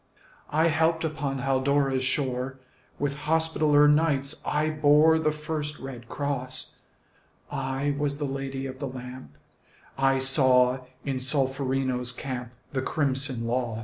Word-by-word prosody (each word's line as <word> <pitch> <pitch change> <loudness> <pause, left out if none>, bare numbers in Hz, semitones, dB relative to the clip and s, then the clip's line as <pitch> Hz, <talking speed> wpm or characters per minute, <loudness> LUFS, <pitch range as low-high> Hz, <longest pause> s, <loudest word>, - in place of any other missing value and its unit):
I 160 +3 +3
helped 160 +1 +1
upon 145 -3 -2
Haldora's 135 0 +1
shore; 130 0 -1 0.4
With 140 -1 -1
Hospitaller 155 -2 +4
Knights 150 -2 +2
I 155 +1 0
bore 155 +1 +5
The 155 -1 +1
first 150 -1 -4
red 125 -3 -9
cross; 130 -3 -2 0.7
I 135 +2 -1
was 140 0 -1
the 145 - -2
Lady 135 -1 -4
of 130 0 -7
the 140 - -3
Lamp; 125 0 -9 0.6
I 135 0 +3
saw 130 -1 +4 0.3
in 135 -2 -1
Solferino's 130 -2 0
camp 125 -2 -5 0.2
The 130 - 0
crimson 135 -4 -1
loss. 120 -2 -1
135 Hz, 125 wpm, -26 LUFS, 130-150 Hz, 0.7 s, bore